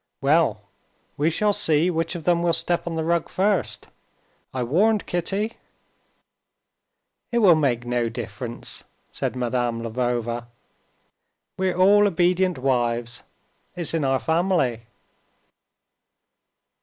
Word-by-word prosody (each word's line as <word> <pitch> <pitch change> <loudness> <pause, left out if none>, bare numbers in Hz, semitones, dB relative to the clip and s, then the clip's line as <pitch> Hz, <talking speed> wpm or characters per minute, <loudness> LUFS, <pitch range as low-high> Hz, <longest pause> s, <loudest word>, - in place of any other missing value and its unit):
"Well, 140 -7 +2 0.5
we 150 +3 +2
shall 205 +5 +1
see 160 0 +2
which 165 +1 -2
of 170 - -6
them 170 +1 +2
will 170 -1 +2
step 170 +1 -1
on 170 - -3
the 160 - -1
rug 170 0 0
first. 185 - 0 0.6
I 130 -1 -2
warned 200 - +2
Kitty." 195 +6 -2 1.7
"It 240 - 0
will 200 -7 +7
make 130 -6 +1
no 120 -1 0
difference," 115 0 -6 0.3
said - - -3
Madame 120 -2 -1
Lvova; 120 0 -2 1.1
"we're 185 -2 -1
all 205 +3 +6
obedient 180 -1 +1
wives; 120 -2 -1 0.5
it's 170 -3 -1
in 165 -2 0
our 135 -1 +2
family." 160 -8 0
160 Hz, 115 wpm, -23 LUFS, 120-175 Hz, 1.7 s, will